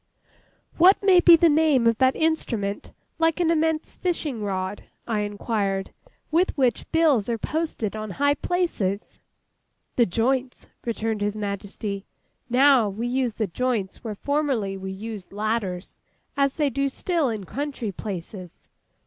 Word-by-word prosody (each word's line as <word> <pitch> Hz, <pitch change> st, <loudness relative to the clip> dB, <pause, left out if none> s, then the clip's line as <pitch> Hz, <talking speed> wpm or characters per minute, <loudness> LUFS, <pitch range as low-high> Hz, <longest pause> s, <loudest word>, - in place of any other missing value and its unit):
'What 375 Hz, +4 st, +6 dB
may 380 Hz, -2 st, +6 dB
be 345 Hz, -1 st, +8 dB
the 335 Hz, +1 st, +4 dB
name 300 Hz, -5 st, +3 dB
of 230 Hz, -1 st, +3 dB
that 260 Hz, 0 st, +4 dB
instrument, 230 Hz, -11 st, -1 dB, 0.3 s
like 325 Hz, +1 st, +2 dB
an 335 Hz, -2 st, +3 dB
immense 320 Hz, -1 st, 0 dB
fishing 310 Hz, -9 st, -2 dB
rod,' 190 Hz, -1 st, -3 dB, 0.2 s
I 225 Hz, -3 st, 0 dB
inquired, 205 Hz, -2 st, -2 dB, 0.4 s
'with 340 Hz, +2 st, +2 dB
which 255 Hz, -5 st, 0 dB
bills 295 Hz, -10 st, +3 dB
are 230 Hz, -, 0 dB
posted 305 Hz, -6 st, -2 dB
on 215 Hz, 0 st, -5 dB
high 285 Hz, +1 st, +3 dB
places?' 290 Hz, -, -2 dB, 0.8 s
'The 240 Hz, -, +4 dB
joints,' 250 Hz, +6 st, -1 dB, 0.2 s
returned 225 Hz, -2 st, -2 dB
His 205 Hz, 0 st, 0 dB
Majesty. 200 Hz, -1 st, -4 dB, 0.4 s
'Now, 255 Hz, -3 st, +5 dB
we 215 Hz, +4 st, -4 dB
use 245 Hz, -2 st, 0 dB
the 220 Hz, -, 0 dB
joints 215 Hz, -1 st, -2 dB
where 220 Hz, -3 st, -4 dB
formerly 270 Hz, -7 st, -1 dB
we 190 Hz, 0 st, -6 dB
used 205 Hz, -1 st, -7 dB
ladders—as 215 Hz, +6 st, -3 dB
they 295 Hz, -3 st, 0 dB
do 275 Hz, +2 st, 0 dB
still 325 Hz, 0 st, 0 dB
in 215 Hz, -3 st, -4 dB
country 270 Hz, -, -4 dB
places. 185 Hz, -2 st, -8 dB
235 Hz, 140 wpm, -24 LUFS, 205-290 Hz, 0.8 s, be